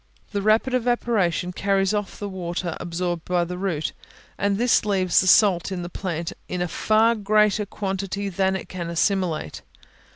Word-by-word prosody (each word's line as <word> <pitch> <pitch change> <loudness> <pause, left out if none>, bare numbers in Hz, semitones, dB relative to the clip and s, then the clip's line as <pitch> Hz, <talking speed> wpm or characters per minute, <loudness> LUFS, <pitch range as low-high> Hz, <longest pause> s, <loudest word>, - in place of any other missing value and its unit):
The 200 - -1
rapid 220 +5 +2
evaporation 225 -8 0
carries 195 +1 +1
off 205 -1 -3
the 205 - -5
water 175 -2 -4
absorbed 175 -1 -3
by 180 -1 +1
the 180 +1 -5
root, 175 -6 -2 0.4
and 200 0 0
this 240 +1 +3
leaves 190 -4 +2
the 185 - -1
salts 190 -1 +4
in 180 -2 -3
the 175 - -6
plant 170 -3 -4 0.2
in 180 - -3
a 180 - 0
far 220 +6 +3
greater 210 -1 +2
quantity 195 0 -3
than 190 0 0
it 190 - -5
can 175 -2 -5
assimilate. 170 - -1
190 Hz, 165 wpm, -23 LUFS, 175-205 Hz, 0.4 s, salts